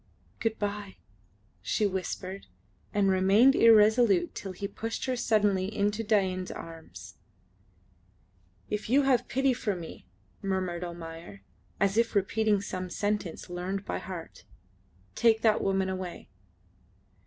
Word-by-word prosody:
"Goodbye," 205 -3 -3 0.6
she 210 - 0
whispered, 190 - -4 0.4
and 200 -2 +2
remained 195 +8 +5
irresolute 220 -5 +5
till 195 - -6
he 200 +2 -5
pushed 225 +3 -4
her 260 -1 0
suddenly 205 -5 +2
into 210 +1 0
Dain's 190 -4 +1
arms. 95 - -10 1.5
"If 210 0 -4
you 280 +4 +4
have 265 -3 +4
any - - -28
pity 270 +1 +2
for 225 -5 -2
me," 170 -2 -9 0.3
murmured 185 -3 -2
Almayer, 165 - -8 0.4
as 195 +1 +2
if 230 -1 +1
repeating 205 +1 +2
some 185 -2 -5
sentence 205 -2 -2
learned 185 +3 -4
by - - -3
heart, 175 -4 -8 0.7
"take 225 -1 +3
that 220 -2 +4
woman 195 -1 +1
away." 185 -2 -5
200 Hz, 120 wpm, -29 LUFS, 185-220 Hz, 1.5 s, remained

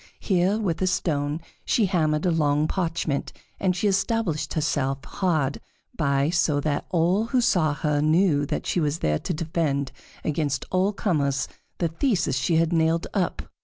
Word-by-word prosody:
Here, 190 +1 +2
with 185 -7 -2
a 185 - +2
stone, 150 -3 -1 0.2
she 225 - +2
hammered 155 -5 +1
a 180 - +3
long 150 -1 +2
parchment, 165 -6 -2 0.3
and 185 -2 +1
she 195 +3 0
established 195 -4 0
herself 135 -3 -1
hard 155 -7 -1 0.3
by, 140 -1 +1
so 160 -4 +2
that 145 -1 -2
all 180 +5 +2
who 255 +2 +1
saw 165 -10 +2
her 150 -1 0
knew 155 -2 +3
that - - -3
she - - 0
was 150 -1 0
there 75 - 0
to - - -4
defend 155 -4 -1 0.3
against 150 -2 -1
all 185 +2 +2
comers 145 -10 0 0.3
the 170 - 0
theses 175 - 0
she 150 +5 +1
had 165 +1 +2
nailed 165 0 +2
up. 190 -4 -1
160 Hz, 165 wpm, -25 LUFS, 145-185 Hz, 0.3 s, a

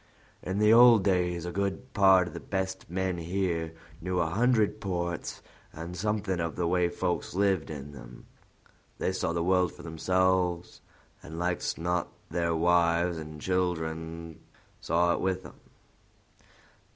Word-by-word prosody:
In 95 +2 -3
the 105 +1 +5
old 120 -3 +8
days, 90 -3 +1
a 90 - -3
good 100 +7 -3
part 95 -3 +5
o' - - -7
the - - -7
best 95 -2 -4
men 95 0 -1
here 85 -2 -1 0.3
knew 90 +1 -1
a 85 - +2
hundred 110 0 +2
ports 85 -3 -3 0.3
and 85 +2 -7
something 100 -1 -1
of 85 -1 -2
the 90 - -1
way 90 0 +2
folks 90 0 -2
lived 95 -4 +1
in 75 -2 -7
them. 60 -4 -12 0.7
They - - 0
saw 95 - -1
the 85 0 -1
world 90 0 +2
for - - -13
themselves, 90 +1 0 0.4
and 80 +1 -9
like's 90 +1 -1
not 90 +1 -1 0.2
their 85 -1 0
wives 85 0 +2
and 75 -1 -8
children 80 -2 -2 0.4
saw 85 +1 +2
it - - -2
with 95 0 -1
them. - - -13
90 Hz, 150 wpm, -29 LUFS, 85-95 Hz, 0.7 s, old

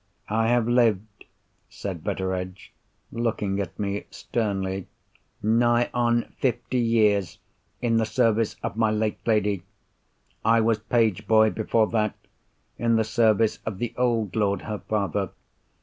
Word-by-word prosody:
"I 110 +1 +1
have 120 -1 +2
lived," 110 -4 +1 0.4
said 90 -6 -6
Betteredge, 95 0 -4 0.4
looking 105 -4 -1
at 95 -4 -4
me 100 0 -3
sternly, 95 -4 -3 0.6
"nigh 120 +2 +3
on 120 -1 +1
fifty 125 0 0
years 105 -5 +2 0.5
in 115 -1 +2
the 110 - +2
service 115 -2 +1
of - - -3
my 110 -1 +2
late 110 0 -1
lady. 105 -4 +2 0.8
I 115 +1 +4
was 110 -1 +2
page 110 -2 +1
boy 110 0 +5
before 110 0 +1
that, 110 -2 0 0.6
in 115 -1 +2
the 110 - +3
service 110 -1 +2
of 110 -4 -4
the 120 +1 -3
old 115 -5 0
lord, 100 -2 +1
her 105 -2 -4
father. 100 -6 -1
110 Hz, 135 wpm, -25 LUFS, 100-115 Hz, 0.8 s, boy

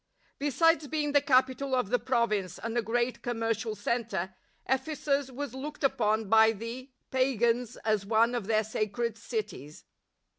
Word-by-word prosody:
^ - - -52 0.4
Besides 310 +2 +3
being 295 0 -1
the 285 0 +4
capital 260 0 +2
of 250 -5 -1
the 245 - +3
Province 215 -7 0
and 230 +1 -5
a 240 - +2
great 240 +2 -1
commercial 225 -2 -2
centre, 205 -3 -2 0.3
Ephesus 280 0 0
was 265 0 -5
looked 295 +3 -7
upon 220 -5 +1
by 220 +1 +6
the 230 +5 -7 0.2
pagans 245 -2 +1
as 215 -2 +2
one 225 +3 +3
of 235 -5 -3
their 220 -1 +2
sacred 220 +2 -2
cities. 225 - -6
240 Hz, 150 wpm, -29 LUFS, 220-265 Hz, 0.4 s, by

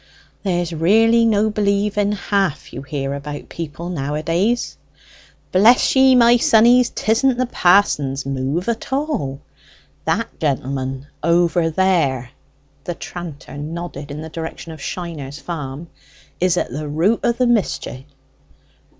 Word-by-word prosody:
"There's 175 -3 -1
really 225 +8 +4
no 215 -1 +2
believing 205 0 +1
half 200 -6 -1
you - - -6
hear 140 -1 -4
about 145 +1 -7
people 165 +1 -6
nowadays." 165 - -1 0.8
"Bless 220 +10 +5
ye, 265 0 +6
my 240 0 +6
sonnies! 235 +2 +5
'tisn't 240 +3 +1
the 255 - +1
pa'son's 175 - +2
move 135 - -2
at 235 +1 -3
all. 265 - -2 0.6
That - - -2
gentleman 135 -2 -2 0.2
over 170 +1 +2
there" 155 -8 +1 0.5
(the 175 - -4
tranter 170 -6 -8
nodded 155 -1 -6
in 150 +2 -6
the 160 - -7
direction 165 +1 -7
of 155 -3 -10
Shiner's 155 -5 -6
farm) 150 -1 -6 0.5
"is 180 0 +2
at - - -1
the 150 +4 -4
root 170 +10 +1
of 235 0 0
the 255 - +2
mischty." 200 - -1
170 Hz, 125 wpm, -20 LUFS, 145-210 Hz, 0.8 s, ye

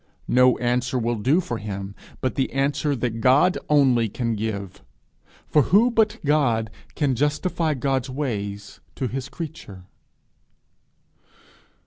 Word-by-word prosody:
No 125 0 +5
answer 125 +1 0
will 120 -1 -1
do 130 - +2
for 120 -10 -4
him 100 -1 -6 0.3
but 130 - -1
the 135 - -1
answer 140 +1 0
that 115 -2 -3
God 140 +9 +4
only 130 -6 +3
can 115 +2 -2
give; 100 -3 -4 0.7
for 150 - +4
who 215 - +4
but 220 -1 +2
God 120 -7 +1 0.2
can 145 -4 +1
justify 150 +4 0
God's 135 0 -1
ways 105 -7 -4 0.2
to 130 - -3
his 135 +3 -5
creature? 145 - -8
130 Hz, 125 wpm, -23 LUFS, 115-145 Hz, 0.7 s, No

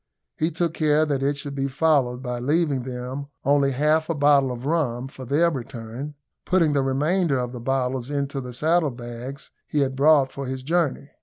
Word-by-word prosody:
He 160 - 0
took 170 0 -1
care 155 -1 +3
that 140 -3 -1
it 140 +1 +1
should 140 0 -5
be 135 0 -1
followed 135 -3 +1
by 125 -1 -3
leaving 145 +1 +1
them 130 +2 -5 0.2
only 140 0 +4
half 150 +4 +1
a 165 - 0
bottle 140 -2 +4
of 125 +1 -6
rum 135 -6 0
for 130 -1 -10
their 155 +7 +3
return 130 +1 -6 0.3
putting 170 -5 +2
the 140 - +2
remainder 145 +4 +1
of 125 -1 -2
the 125 -2 -7
bottles 130 0 -1
into 140 -1 -2
the 125 -1 -7
saddle 155 +5 +2
bags 120 +2 -8 0.2
he 150 - 0
had 135 -1 0
brought 140 -1 +4
for 140 -1 -6
his 130 0 -4
journey. 150 -2 0
140 Hz, 190 wpm, -24 LUFS, 130-150 Hz, 0.3 s, only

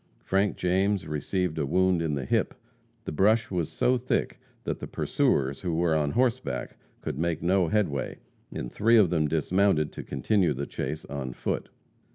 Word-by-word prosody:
Frank 95 +1 +1
James 95 +2 +1
received 80 +2 -2
a 75 - +1
wound 95 +2 +2
in 80 -3 -1
the 70 -2 -3
hip. - - 0 0.5
The - - -3
brush 105 +8 +2
was 85 -4 -1
so 125 +1 +2
thick 125 - -1 0.2
that - - -3
the - - -6
pursuers, 70 0 0
who 85 -3 -1
were 85 -1 +2
on 75 -2 +1
horseback, 115 - 0 0.3
could 65 - -4
make 85 -1 -1
no 90 0 +3
headway, 80 -9 -1 0.3
and - - -5
three 115 +3 +4
of 100 -6 +5
them 80 -3 +2
dismounted 80 +1 +2
to - - -7
continue 100 -8 +1
the 70 +2 -3
chase 80 +2 -4
on 65 -3 -5
foot. - - -3
85 Hz, 175 wpm, -27 LUFS, 75-100 Hz, 0.5 s, of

